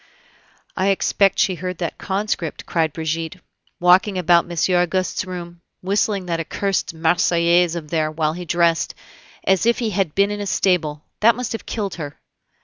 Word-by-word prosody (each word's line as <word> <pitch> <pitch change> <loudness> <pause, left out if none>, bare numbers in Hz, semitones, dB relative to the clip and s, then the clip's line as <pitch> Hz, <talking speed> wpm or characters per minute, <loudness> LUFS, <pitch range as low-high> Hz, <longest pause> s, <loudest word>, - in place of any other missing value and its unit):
"I 190 - 0
expect 195 0 +2
she 190 - +2
heard 180 +1 -5
that 170 -2 -4
conscript," 190 -4 -3
cried 160 -2 0
Brigitte, 160 +3 -3 0.4
"walking 185 +3 +4
about 175 -1 +3
Monsieur 175 +1 +2
Auguste's 185 +3 -1
room, 175 -2 -8 0.2
whistling 200 0 0
that 170 -2 -2
accursed 195 +4 -1
Marseillaise 170 +1 +3
of 155 -3 -6
theirs 155 -2 0
while 155 -1 0
he 175 +1 -7
dressed, 170 -1 +1 0.5
as 190 +3 +2
if 235 - +3
he 230 -3 -1
had 190 -5 -1
been 200 +1 +3
in 205 0 -4
a 200 - -3
stable! 155 -7 0 0.2
That 230 +1 +5
must 250 -2 -4
have 225 - -5
killed 205 -4 -3
her." 145 -1 -7
180 Hz, 165 wpm, -21 LUFS, 165-195 Hz, 0.5 s, That